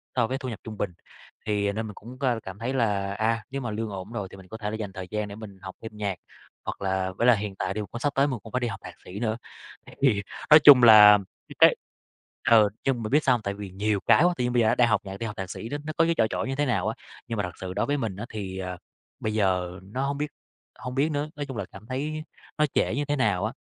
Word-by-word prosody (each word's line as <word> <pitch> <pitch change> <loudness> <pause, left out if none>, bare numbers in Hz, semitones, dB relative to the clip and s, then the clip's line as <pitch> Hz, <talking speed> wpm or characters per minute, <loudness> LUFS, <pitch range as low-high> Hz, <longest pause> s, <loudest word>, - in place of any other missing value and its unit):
so 115 - +2
với 130 - -2
thu 130 -2 -5
nhập 115 - -6
trung 110 -1 -8
bình. 95 -3 -2 0.5
Thì 105 -1 +1
nên 110 +2 -3
mình 105 - -8
cũng 120 +4 -11
c - - -20 0.2
cảm 95 +1 -8
thấy 120 +4 -2
là, 100 -6 0
à, 110 +2 0
nếu 135 0 -3
mà 120 -4 -3
lương 110 +1 -3
ổn 95 +1 -7
rồi 105 -5 -4
thì - - -11
mình 95 -1 -14
có 110 - -8
thể 105 -2 -3
là - - -3
dành 105 -3 -5
thời 95 -1 -7
gian 105 -1 -2
để 100 - -8
mình 105 -3 -10
học 95 -1 -8
thêm 110 -1 -9
nhạc, 100 -2 -2 0.5
hoặc - - -5
là 95 -1 0
với 120 - +2
là 125 - +8
hiện 105 -1 -4
tại 95 0 -2
thì 105 - -4
cũng 120 - -5
sắp 145 +2 0
tới 140 +1 +4
mình 130 -5 -3
cũng 115 - -11
phải 125 - +1
đi 120 - -1
học 100 -4 -5
thạc - - -8
sĩ 95 +3 -7
nữa. 110 -1 -1 0.5
Thì - - -12
thì 120 -8 +3 0.3
nói 150 0 +10
chung 140 -4 +10
là, 105 -2 +10 0.3
cái - - -11
cái, - - +7 0.8
ừ, 105 -1 +4
chung 125 -4 0
bạn 110 - -4
biết 150 +2 +4
sao 130 - +4
hông, 120 - -4
tại 100 -2 -3
vì 100 -1 -7
nhiều 100 +2 0
cái - - +6
quá, 175 0 +4
tự 125 - 0
nhiên 125 0 0
bây 120 - +4
giờ 110 - +3
á - - +3
đang 120 - +4
học 110 -2 +2
nhạc, 95 -1 -7
đi 115 - -4
học 105 -2 -5
thạc 95 -1 -4
sĩ 110 - -6 0.2
nó 155 - -4
có 165 - +5
cái 170 - +2
chỏi 110 - +4
chỏi - - -2
như 135 - -2
thế 145 +2 +1
nào 125 -4 0
á. - - -1 0.3
Nhưng 115 - -3
mà 105 - 0
thật 90 - -4
sự 95 -1 -4
đối 105 +4 0
với 145 +3 0
mình 110 -8 -3
á 105 +4 -6
thì, 95 -3 -5
ờ, 90 -1 -4 0.4
bây 110 - -2
giờ 90 -3 0
nó 130 +8 -3
hông 140 0 -2
biết 150 +1 -1 0.5
hông 125 0 -6
biết 140 +3 +2
nữa, 145 +1 -2
nói 145 0 -4
chung 135 -4 -7
là 100 - -3
cảm 95 +2 -12
thấy 150 +4 -3 0.3
nó 150 - +4
trễ - - +1
như 145 +1 -1
thế 145 0 0
nào 105 -8 +1
á, 110 - -3
110 Hz, 300 wpm, -26 LUFS, 100-130 Hz, 0.8 s, nói